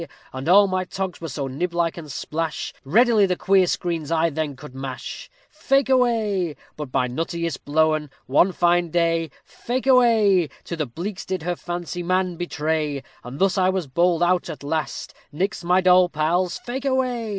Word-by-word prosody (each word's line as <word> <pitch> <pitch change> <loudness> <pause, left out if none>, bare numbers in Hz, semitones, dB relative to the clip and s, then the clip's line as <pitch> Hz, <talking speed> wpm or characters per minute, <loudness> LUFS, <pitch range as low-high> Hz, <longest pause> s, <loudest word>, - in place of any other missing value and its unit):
_ 130 +2 -6
All 200 +4 +7
my 185 -1 -1
togs 185 0 -5
were 165 - -5
so 135 0 -3
niblike 170 +4 -1
and 155 -4 -8
splash, 160 +3 -4
Readily 215 - +4
the 180 - 0
queer 190 0 +3
screens 165 -3 -2
I 165 0 +2
then 150 -1 -3
could 140 +1 -11
smash; 130 0 -7 0.2
Fake 275 -1 +1
away. 220 - +1 0.2
But 150 -4 -7
my 125 - +1
nuttiest 165 +4 -3
blowen, 155 0 +1 0.2
one 160 +8 +3
fine 175 -1 +2
day, 165 -1 +1 0.2
Fake 250 +2 -4
away, 220 - +4
To 170 - -5
the 155 -3 -2
beaks 180 - -6
did 185 -3 -4
her 175 +1 -1
fancy 175 0 -5
man 185 0 0
betray, 155 -4 -2 0.2
And 125 +3 -8
thus 195 +3 +2
was 185 -1 +1
I - - -19
bowled 170 +4 +2
out 180 0 +1
at 145 - -7
last 155 0 -3 0.2
_Nix 190 +5 -2
my 180 +2 +3
doll 180 -1 +5
pals, 170 +3 0
fake 260 +3 -6
away. 255 -4 0
175 Hz, 175 wpm, -23 LUFS, 155-190 Hz, 0.2 s, All